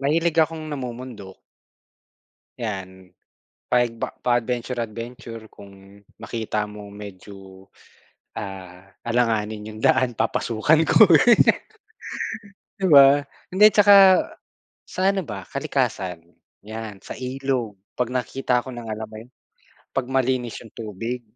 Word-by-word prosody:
mahilig 160 +4 +1
akong 160 0 0
namumundok. 120 -7 -7 1.2
Yan. 95 -5 -6 0.6
Payag 120 -2 +2
pa - - -1 0.2
pa-adventure-adventure 120 -1 -3
kung 100 0 -15 0.2
makita 110 -2 -3
mo 105 -1 -10
medyo, 95 -1 -12 0.7
ah, 95 -2 -8 0.2
alanganin 110 -3 -1
yung 110 - -10
daan 130 -2 +3
papasukan 115 +7 +2
ko. 220 - +8 1.8
'Di 190 - +1
ba? 140 0 +8 0.3
Hindi, 210 +3 +7
'tsaka, 200 -2 +7 0.6
sa - - -6
ano 195 -1 -1
ba 100 -4 -7
kalikasan, 90 -3 -2 0.4
'yan 110 -2 -7
sa - - -7
ilog, 130 -4 -3 0.2
'pag 125 -2 0
nakita 125 -1 -1
ko 130 - -7
na 120 -1 -8
nga 110 - -2
alam 110 0 -6
mo - - -9
yun, 125 - -19 0.7
'pag 130 -2 -1
malinis 130 -2 0
yung 110 - -16
tubig, 115 +3 -5
115 Hz, 110 wpm, -23 LUFS, 105-130 Hz, 1.8 s, ko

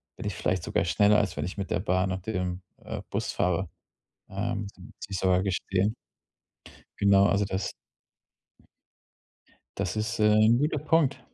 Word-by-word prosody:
bin - - -8
ich 100 -3 -2
vielleicht 90 -2 -1
sogar - - 0
schneller, 105 +4 +4
als 95 -3 0
wenn - - -3
ich 90 - -6
mit 100 -1 -4
der - - +1
Bahn 95 -1 +1
und 95 0 -4
dem, 90 -3 -2 0.2
äh, - - -5
Bus - - -2
fahre. 90 0 0 0.6
Ähm, 105 +1 -3
muss 90 - -13
ich 100 -2 -4
sogar 90 0 +3
gestehen. 95 +2 0 1.1
Genau, 100 0 +5
also 100 0 +2
das 95 0 -2 2.1
das 90 - -2
ist, 110 +1 -2
äh, 105 - +4 0.2
'n 115 +1 +5
guter 150 +2 +1
Punkt. 145 -5 +2
100 Hz, 160 wpm, -27 LUFS, 95-105 Hz, 2.1 s, Genau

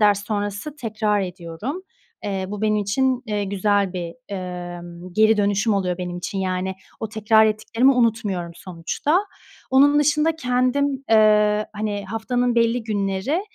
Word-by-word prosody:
ders 205 -1 +3
sonrası 205 +6 -3
tekrar 215 -5 0
ediyorum. 185 - -5 0.4
Eee, 195 -2 -2
bu 210 +1 -5
benim 215 0 +2
için, 255 +5 +1
eee, 210 -2 -1
güzel 200 -1 +1
bir, 175 -2 -5
emm, 175 -2 -7
geri 220 +3 +4
dönüşüm 205 +2 +2
oluyor 180 -2 -1
benim 180 -1 -4
için, 185 +2 -4
yani, 185 0 -1 0.3
o 220 - -3
tekrar 220 0 +4
ettiklerimi 225 +5 +2
unutmuyorum 210 -8 0
sonuçta. 185 - -1 0.5
Onun 285 +3 +5
dışında 300 +2 +2
kendim, 265 +1 0
ııı, 210 -1 +5
hani, 210 -1 -3
haftanın 245 +4 -1
belli 230 +1 +2
günleri 205 - -1
210 Hz, 135 wpm, -22 LUFS, 190-240 Hz, 0.5 s, Onun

